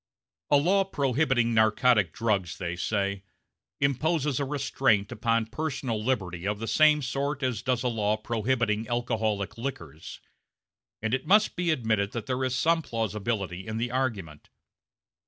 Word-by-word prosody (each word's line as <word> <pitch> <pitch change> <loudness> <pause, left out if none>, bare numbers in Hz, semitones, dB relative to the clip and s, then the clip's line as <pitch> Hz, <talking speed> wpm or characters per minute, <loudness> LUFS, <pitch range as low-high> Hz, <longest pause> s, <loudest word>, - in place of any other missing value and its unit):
A 145 - +6
law 190 +7 +3
prohibiting 135 -7 +1
narcotic 110 -3 +3
drugs, 100 -2 -1
they 85 -2 -3
say, 100 +1 -1 0.6
imposes 145 +1 +1
a 140 - 0
restraint 135 -7 +1
upon 115 +1 0
personal 130 -4 -3
liberty 95 -8 -2
of 105 0 -1
the 115 +2 -5
same 150 +1 +4
sort 140 +2 -2
as 125 -5 -1
does 125 -1 0
a - - +1
law 110 -3 0
prohibiting 115 -1 -1
alcoholic 110 -4 -1
liquors. 80 - -7 0.8
And 110 +1 -1
it 130 - -1
must 210 +3 +4
be 180 -1 -1
admitted 110 -8 0
that 115 -3 -4
there 130 +2 -2
is 130 -1 0
some 165 +3 +2
plausibility 105 - -3
in 110 0 -3
the 120 +1 -2
argument. 105 - -3
115 Hz, 145 wpm, -27 LUFS, 105-135 Hz, 0.8 s, A